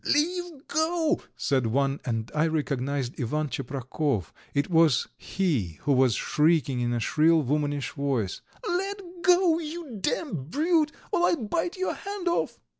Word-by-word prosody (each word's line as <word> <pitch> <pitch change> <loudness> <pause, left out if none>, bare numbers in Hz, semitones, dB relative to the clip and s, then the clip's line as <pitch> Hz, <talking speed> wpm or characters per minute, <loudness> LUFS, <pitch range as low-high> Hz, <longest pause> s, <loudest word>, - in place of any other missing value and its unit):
"Leave 335 0 0
go," 320 +1 +1 0.2
said 130 -4 +1
one, 135 +4 +1
and 115 -3 -2
I 155 +2 +2
recognized 140 -4 -2
Ivan 150 +5 -1
Tcheprakov; 130 - -2 0.2
it 140 0 0
was 160 -6 +4
he 130 - -1
who 145 - +1
was 130 -4 +4
shrieking 150 -5 +2
in 120 0 0
a 120 - 0
shrill, 155 +5 +3
womanish 145 +1 -1
voice: 135 - -1 0.3
"Let 390 +2 -1 0.2
go, 355 -2 +4
you 310 -6 -6
damned 170 - -2
brute, 310 - +2 0.2
or 355 -3 +3
I'll 280 -10 0
bite 340 - -1
your 375 - -1
hand 400 -2 -5
off." 345 - 0
155 Hz, 145 wpm, -27 LUFS, -, 0.3 s, was